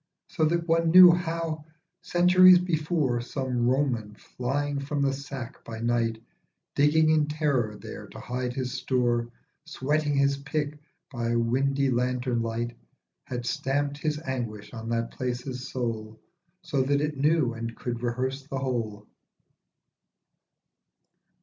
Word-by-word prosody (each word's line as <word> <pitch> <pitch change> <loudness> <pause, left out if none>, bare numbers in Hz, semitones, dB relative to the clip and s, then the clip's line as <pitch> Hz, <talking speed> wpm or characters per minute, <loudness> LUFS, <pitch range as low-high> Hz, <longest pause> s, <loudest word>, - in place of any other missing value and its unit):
So 165 -4 +1
that 170 +2 0
one 165 0 +3
knew 180 +1 +10
how, 165 -2 -2 0.4
centuries 180 +1 +6
before, 155 -7 0
Some 125 -1 -1
Roman 125 -6 0
flying 140 +6 -3
from 140 +1 -2
the 135 -1 +2
sack 135 -3 -7
by 115 -1 -7
night, 115 -1 0 0.5
Digging 155 +2 +4
in 155 -1 +3
terror 140 -8 0
there - - -8
to - - -11
hide 125 0 -3
his 125 -1 -3
store, 125 -2 0 0.4
Sweating 145 0 0
his 140 0 +2
pick, 150 +1 -3 0.3
by 120 -2 -1
windy 135 +4 +1
lantern 125 0 0
light, 115 +1 -3 0.5
Had 125 -1 -5
stamped 145 +3 -1
his 155 -1 -1
anguish 110 -5 -4
on 115 -1 -6
that 115 0 -1
place's 125 +1 -4
soul, 110 -3 -4 0.4
So 145 -6 0
that 140 +2 +2
it 150 0 -2
knew 150 -4 +2
and 115 0 -5
could 120 0 -4
rehearse 130 +3 -2
the 135 - -4
whole. 115 -6 -3
130 Hz, 130 wpm, -27 LUFS, 120-150 Hz, 0.5 s, knew